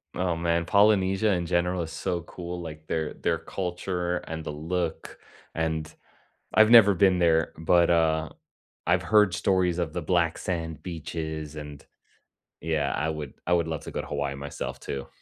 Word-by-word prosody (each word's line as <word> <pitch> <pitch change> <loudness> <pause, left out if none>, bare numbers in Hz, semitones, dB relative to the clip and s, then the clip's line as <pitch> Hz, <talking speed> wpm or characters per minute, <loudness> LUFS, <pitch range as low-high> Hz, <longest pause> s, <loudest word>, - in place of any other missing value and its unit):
Oh, 90 -1 0
man, 85 0 0
Polynesia 100 0 +3
in 90 -2 0
general 90 +1 0
is 80 - -7
so 85 +1 -2
cool, 90 0 -7
like, 80 -2 -9
their 80 -2 -2
their - - -1
culture 90 -1 -3
and 80 -2 -6
the - - -4
look, 80 +2 -3 0.4
and 80 -1 -2 0.6
I've 110 0 +6
never 115 -4 +8
been 95 0 +4
there, 80 -2 +3
but, 85 +2 +3
uh, 80 -2 +2 0.6
I've 90 +2 +3
heard 105 0 +4
stories 95 -4 +1
of 80 -3 -2
the 90 - -2
black 85 0 +1
sand 80 -4 -4
beaches, 80 -3 -5
and 75 -2 -8 0.8
Yeah, 75 -3 -1
I 75 +3 -1
would 75 -2 -6
I 90 - +1
would 85 -1 +2
love 80 -2 -4
to - - -7
go - - -3
to - - -10
Hawaii 70 -1 -3
myself 70 +1 -6
too. 70 -1 -6
85 Hz, 170 wpm, -26 LUFS, 80-90 Hz, 0.8 s, never